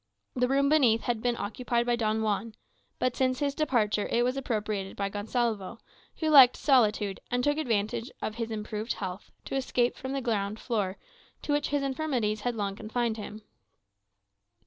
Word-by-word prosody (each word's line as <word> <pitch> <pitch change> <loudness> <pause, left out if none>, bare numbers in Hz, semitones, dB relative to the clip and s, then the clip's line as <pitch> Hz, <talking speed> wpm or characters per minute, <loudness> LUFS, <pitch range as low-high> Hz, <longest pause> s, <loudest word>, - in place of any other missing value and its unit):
The 250 0 +2
room 275 +2 +2
beneath 255 -7 +4
had 235 -2 -1
been 240 0 0
occupied 235 +3 -1
by 240 0 +2
Don 220 -1 0
Juan, 215 +1 -1 0.4
but 255 -1 0
since 255 -1 +1
his 280 +1 0
departure 230 -9 +1
it 240 - +2
was 250 +1 0
appropriated 210 -7 -3
by 200 -1 -1
Gonsalvo, 215 0 -2 0.4
who 315 - 0
liked 265 -4 +9
solitude, 215 -7 +2
and 245 0 0
took 290 +2 +1
advantage 225 -2 -1
of 215 - -3
his 230 0 -4
improved 215 +1 -3
health 190 0 -6 0.2
to - - -4
escape 250 -2 +1
from 260 +1 -5
the 275 - -1
ground 215 -3 -1
floor, 205 -5 -2 0.5
to - - -2
which 290 0 +1
his 285 -1 0
infirmities 260 -7 -1
had 245 +1 -1
long 200 -2 -2
confined 225 +1 -2
him. 215 0 -8
235 Hz, 170 wpm, -28 LUFS, 210-255 Hz, 0.5 s, liked